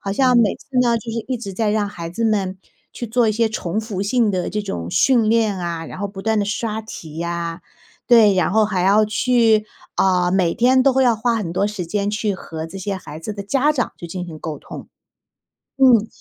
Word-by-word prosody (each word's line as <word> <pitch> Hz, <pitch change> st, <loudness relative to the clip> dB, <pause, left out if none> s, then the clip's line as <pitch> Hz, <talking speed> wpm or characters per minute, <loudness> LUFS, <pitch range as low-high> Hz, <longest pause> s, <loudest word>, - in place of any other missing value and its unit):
好 195 Hz, -1 st, -3 dB
像 255 Hz, +2 st, +3 dB
每 220 Hz, -4 st, +3 dB
次 -, -, -18 dB
呢， 235 Hz, -2 st, +3 dB
就 225 Hz, +1 st, -7 dB
是 230 Hz, 0 st, -4 dB
一 255 Hz, -, -2 dB
直 210 Hz, -4 st, -7 dB
在 210 Hz, +2 st, 0 dB
让 210 Hz, -1 st, 0 dB
孩 170 Hz, -4 st, -7 dB
子 230 Hz, +6 st, -2 dB
们， 195 Hz, -4 st, 0 dB, 0.3 s
去 240 Hz, -, -6 dB
做 230 Hz, 0 st, +2 dB
一 -, -, +2 dB
些 225 Hz, +1 st, +1 dB
重 210 Hz, -1 st, -3 dB
复 210 Hz, -4 st, -4 dB
性 225 Hz, +1 st, +2 dB
的 180 Hz, -1 st, -2 dB
这 210 Hz, +2 st, -2 dB
种 85 Hz, -, -5 dB
训 240 Hz, -5 st, +3 dB
练 220 Hz, -4 st, +2 dB
啊。 170 Hz, -2 st, -4 dB
然 -, -, -9 dB
后 200 Hz, -, -2 dB
不 195 Hz, -1 st, -9 dB
断 220 Hz, 0 st, +1 dB
地 205 Hz, -, +1 dB
刷 215 Hz, +1 st, -3 dB
题 165 Hz, -6 st, -8 dB
啊， 170 Hz, 0 st, -4 dB, 0.5 s
对。 220 Hz, -5 st, +6 dB
然 185 Hz, -, +1 dB
后 220 Hz, +1 st, +4 dB
还 190 Hz, -4 st, -1 dB
要 205 Hz, +3 st, +4 dB
去 225 Hz, -1 st, +3 dB, 0.3 s
啊， 180 Hz, -2 st, +2 dB
每 180 Hz, -3 st, +1 dB
天 255 Hz, +2 st, +4 dB
都 275 Hz, -1 st, +4 dB
会 265 Hz, -, +3 dB
要 235 Hz, -2 st, +3 dB
花 235 Hz, +2 st, 0 dB
很 205 Hz, -7 st, -3 dB
多 195 Hz, +3 st, +1 dB
时 205 Hz, -4 st, -5 dB
间， 205 Hz, +3 st, -1 dB
去 210 Hz, -1 st, -1 dB
和 160 Hz, -3 st, -7 dB
这 170 Hz, +4 st, -9 dB
些 195 Hz, +1 st, -3 dB
孩 155 Hz, -4 st, -9 dB
子 210 Hz, +6 st, -5 dB
的 200 Hz, -1 st, -6 dB
家 275 Hz, +8 st, +2 dB
长 255 Hz, -5 st, -2 dB
去 170 Hz, -, -7 dB
进 180 Hz, +1 st, -5 dB
行 160 Hz, -2 st, -9 dB
沟 155 Hz, -2 st, -6 dB
通。 -, -, -10 dB, 0.9 s
嗯， 245 Hz, -5 st, +5 dB
210 Hz, 250 characters per minute, -20 LUFS, 185-230 Hz, 0.9 s, 对